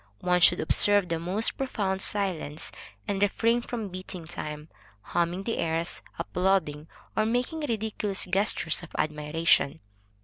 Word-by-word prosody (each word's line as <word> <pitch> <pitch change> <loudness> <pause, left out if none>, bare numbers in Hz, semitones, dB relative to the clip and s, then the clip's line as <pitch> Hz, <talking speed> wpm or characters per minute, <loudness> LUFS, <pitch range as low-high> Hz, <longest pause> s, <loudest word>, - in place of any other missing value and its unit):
One 180 0 +2
should - - +7
observe 205 +3 +4
the 165 -1 -1
most 185 +7 -1
profound 200 -8 -1
silence, 180 -8 -1 0.4
and 200 -1 -1
refrain 230 +4 +2
from 230 -4 -5
beating 185 -1 -7
time, 150 -1 -6 0.4
humming 175 +2 -1
the 230 - -2
airs, 165 +1 -1 0.2
applauding, 180 -5 0 0.3
or 215 - +3
making 245 +8 -1
ridiculous 220 -7 -1
gestures 185 -4 +1
of 175 - -10
admiration. 150 0 +1
185 Hz, 130 wpm, -27 LUFS, 165-210 Hz, 0.4 s, should